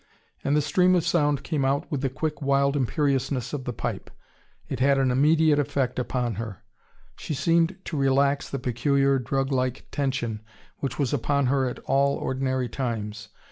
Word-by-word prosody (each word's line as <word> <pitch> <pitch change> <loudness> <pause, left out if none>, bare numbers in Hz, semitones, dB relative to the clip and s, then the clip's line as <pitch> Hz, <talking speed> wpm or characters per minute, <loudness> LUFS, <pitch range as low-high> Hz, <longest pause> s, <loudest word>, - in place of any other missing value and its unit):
And 140 - +1
the 150 - +2
stream 180 +4 +3
of 175 - +1
sound 145 -4 +1
came 150 -5 -1
out 135 +1 0
with 140 -3 -1
the 135 - 0
quick 150 +4 -3
wild 140 0 +2
imperiousness 135 -1 0
of 135 -3 -4
the - - -2
pipe. 115 - -4 0.6
It 130 - -4
had 135 +1 +4
an 135 -2 +2
immediate 150 +3 +4
effect 135 -3 -1 0.2
on 120 -2 0
her. 105 -4 -7 0.5
She 155 - -4
seemed 165 +5 +2
to 155 - -4
relax 140 +1 +2
the 140 - -3
peculiar, 135 +2 +1
drug 135 +3 -1
like 130 -1 -1
tension 130 -6 -2 0.4
which 135 - -3
was 140 -3 0
upon 140 +1 +1
her 135 -2 +2
at - - -7
all 140 +1 +2
ordinary 130 -1 -1
times. 110 -3 -4
135 Hz, 175 wpm, -25 LUFS, 130-145 Hz, 0.6 s, had